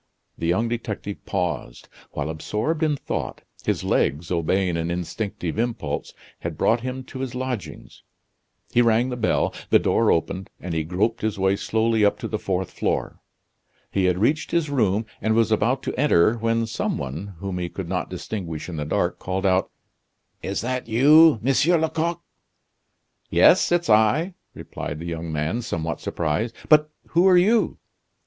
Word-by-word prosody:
The 85 - -3
young 95 +7 +2
detective 110 -3 -4
paused. 90 -10 -3 0.2
While 75 +1 -3
absorbed 110 - -2
in 155 -2 +2
thought, - - -4 0.2
his - - 0
legs, 80 +4 0
obeying 90 +1 +1
an 85 0 -2
instinctive 90 +1 -3
impulse, 115 -12 -3 0.2
had - - -5
brought 115 +1 +2
him 130 +1 -4
to 130 - -9
his 130 -2 -4
lodgings. 125 -4 -5 0.7
He 120 - +4
rang 115 +2 +3
the 125 - -3
bell; 110 -3 +1 0.2
the - - +7
door - - +2
opened, 90 +3 -1
and 90 -2 -5
he 80 -1 0
groped 100 +8 -1
his 110 -1 -1
way 95 0 +2
slowly 110 +1 +1
up 100 - +3
to - - -5
the 110 - -3
fourth 95 -1 -2
floor. - - -2 0.7
He 95 -1 +1
had 90 -1 +2
reached 145 +10 +1
his 165 -4 0
room, 110 -5 +1 0.2
and 110 0 +1
was 115 -1 +3
about 120 +5 +1
to - - -3
enter, 110 -9 +4
when 115 0 0
some 110 - -2
one, 80 +9 -6
whom 95 0 -4
he 90 -1 -3
could - - -6
not - - -2
distinguish 85 -8 -5
in 85 -3 -6
the 75 - -3
dark, - - -1
called 95 +2 -3
out: 95 -1 +2 0.7
"Is 100 - -2
that 125 +1 -3
you, 145 +6 +6
Monsieur 145 +7 +3
Lecoq?" 160 +1 -1 1.1
"Yes, - - +5
it's 175 0 +2
I!" 110 - +3 0.2
replied 75 - -6
the 85 - -7
young 85 -1 -4
man, 80 +9 -1
somewhat 80 -7 -3
surprised; 85 +8 -2
"but 150 0 +6 0.2
who 175 +3 +4
are 185 -1 +6
you?" 215 +6 +3
110 Hz, 170 wpm, -23 LUFS, 90-125 Hz, 1.1 s, the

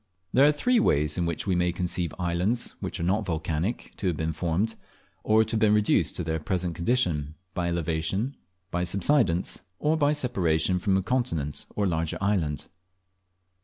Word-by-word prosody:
There 135 +3 +6
are - - +6
three 235 +12 +2
ways 75 - +2
in 85 - +1
which 85 - -3
we 95 - +1
may 90 0 +2
conceive 90 -1 -2
islands 90 +7 0
which - - -5
are - - -2
not 100 +5 +1
volcanic 85 +3 -2
to 100 - -2
have 85 -4 0
been 80 0 -1
formed, 85 +7 0 0.5
or 110 +1 +4
to 110 - -6
have 110 - +1
been 105 -1 +4
reduced 100 -6 +2
to 90 - -2
their 80 0 -1
present 90 +2 -1
condition, 85 - 0 0.2
by 90 -2 -1
elevation, 85 - -1 0.4
by 90 - -1
subsidence, 95 - +2 0.2
or 150 +7 +1
by 150 -1 +3
separation 95 - +1
from 95 0 +2
a 95 - 0
continent 90 - -1
or 105 - +1
larger 80 -3 -1
island. 95 -8 0
90 Hz, 175 wpm, -27 LUFS, 80-110 Hz, 0.5 s, There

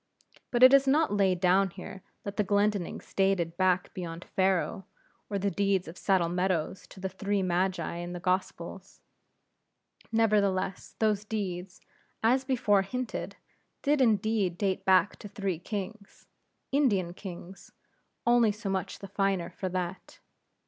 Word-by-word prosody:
But 245 0 +2
it 260 +1 +10
is 275 0 +6
not 295 -4 +3
laid 190 -3 +2
down 190 +2 +4
here 190 +1 -9 0.2
that 200 0 -5
the 210 - +2
Glendinnings 205 -2 0
dated 190 -4 +1
back 185 -1 +1
beyond 170 -1 -6
Pharaoh, 190 0 +1 0.4
or 200 - -1
the 200 +1 0
deeds 195 -3 +1
of 165 - -8
Saddle 185 -2 +2
Meadows 180 0 -1
to - - -13
the 190 - -2
Three 195 +1 -1
Magi 180 0 0
in 175 +1 -5
the 175 - -5
Gospels. 185 +1 -3 1.1
Nevertheless, 205 -4 +1
those 210 -2 +1
deeds, 190 -4 -4 0.4
as 255 +4 +3
before 235 -7 +2
hinted, 250 +5 -4 0.5
did 290 -1 +3
indeed 215 -5 +2
date 195 -1 -1
back 190 +1 +4
to - - -9
three 195 -4 -3
kings 200 +2 -7 0.5
Indian 205 -12 +2
kings 185 0 -10 0.5
only 235 -2 +5
so 205 -1 -4
much 190 -1 -2
the 195 - -9
finer 195 -3 0
for 190 - -4
that. 180 0 -4
195 Hz, 140 wpm, -29 LUFS, 185-210 Hz, 1.1 s, it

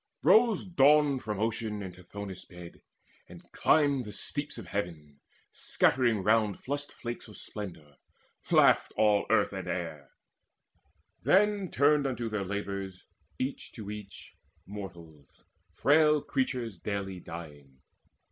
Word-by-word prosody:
Rose 225 -2 +5
Dawn 150 -4 +4
from 105 -4 -4
Ocean 110 -1 -2
and 95 -2 -7
Tithonus' 95 +1 -8
bed, 90 -1 -12 0.5
And - - -12
climbed 140 -5 +3
the 105 - -7
steeps 145 +6 -3
of 115 - -8
heaven, 80 -6 -5 0.3
scattering 120 -6 +1
round 105 -1 +2
Flushed 145 +2 -4
flakes 120 0 -7
of 105 - -12
splendour; 85 -9 -8 0.5
laughed - - +4
all 105 -2 +3
earth - - +3
and - - -5
air. 80 -6 -4 1.1
Then 200 -1 +3
turned 145 +1 +3
unto 120 -3 -3
their 105 -2 -2
labours, 100 -1 -5 0.3
each 130 +2 -4
to 105 -3 -7
each, 105 -2 -10 0.3
Mortals, 85 -7 -10 0.4
frail 150 +1 +4
creatures 125 -7 -2
daily 95 -1 -4
dying. 75 -6 -11
105 Hz, 120 wpm, -30 LUFS, 90-135 Hz, 1.1 s, Rose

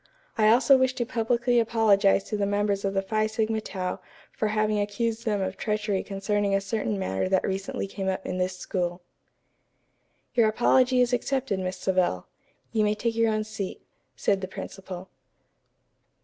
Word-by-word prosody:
I 215 -1 +3
also 260 +4 +6
wish 260 0 +2
to 240 - -1
publicly 240 +1 +1
apologize 215 -4 +3
to 215 - -4
the 205 -1 0
members 205 0 0
of 195 0 -1
the 195 - +1
Phi 215 +2 0
Sigma 220 0 -1
Tau 185 -3 -4 0.3
for 215 - -1
having 215 0 +1
accused 220 +3 -2
them 210 -3 0
of 190 0 -3
treachery 210 -2 -1
concerning 200 0 -1
a - - +3
certain 210 +1 -2
matter 95 - -1
that 190 0 +2
recently 195 0 -3
came 195 0 -5
up 190 0 -3
in 185 - -3
this 185 0 -1
school." 175 -1 -3 1.3
"Your 230 -3 +4
apology 250 +3 +3
is 245 0 +2
accepted, 250 -4 0
Miss 185 0 -3
Savell. 180 - 0 0.5
You 220 -1 +2
may 210 0 +2
take 230 +2 -1
your 230 -1 +3
own 215 0 0
seat," 215 -3 -6 0.3
said 195 -1 +1
the 190 - -3
principal. 190 -1 -8
210 Hz, 170 wpm, -26 LUFS, 195-225 Hz, 1.3 s, also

